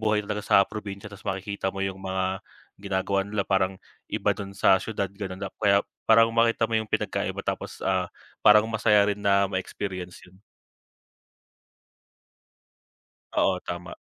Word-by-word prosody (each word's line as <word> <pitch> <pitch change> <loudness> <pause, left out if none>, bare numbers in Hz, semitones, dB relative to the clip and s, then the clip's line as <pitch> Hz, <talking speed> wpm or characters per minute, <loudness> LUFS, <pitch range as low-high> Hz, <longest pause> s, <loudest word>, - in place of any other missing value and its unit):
buhay 105 -1 +1
talaga 105 0 -3
sa 100 -1 +5
probinsya, 100 -1 -7
ta's 100 - -12
makikita 95 0 -2
mo 95 - -7
yung 95 0 -4
mga 95 0 -2 0.4
ginagawa 100 0 0
nila 105 -1 -2
parang 95 -1 +1 0.3
iba - - +1
dun 100 -1 -7
sa 95 0 +5
siyudad 100 -3 -3
gano'n. 95 -1 -6 0.2
Kaya 100 -2 +4 0.2
parang 115 0 +6
makita 115 0 +3
mo - - 0
yung 110 - -3
pinagkaiba - - -1
tapos, - - -4
ah, - - +1 0.4
parang 105 0 +8
masaya 105 -2 +4
rin 100 - -3
na 100 -1 +3
ma-experience 95 -1 -5
'yon. 95 +1 -20 3.0
Oo, 95 -2 +2
tama. 85 0 -6
100 Hz, 140 wpm, -26 LUFS, 95-105 Hz, 3.0 s, parang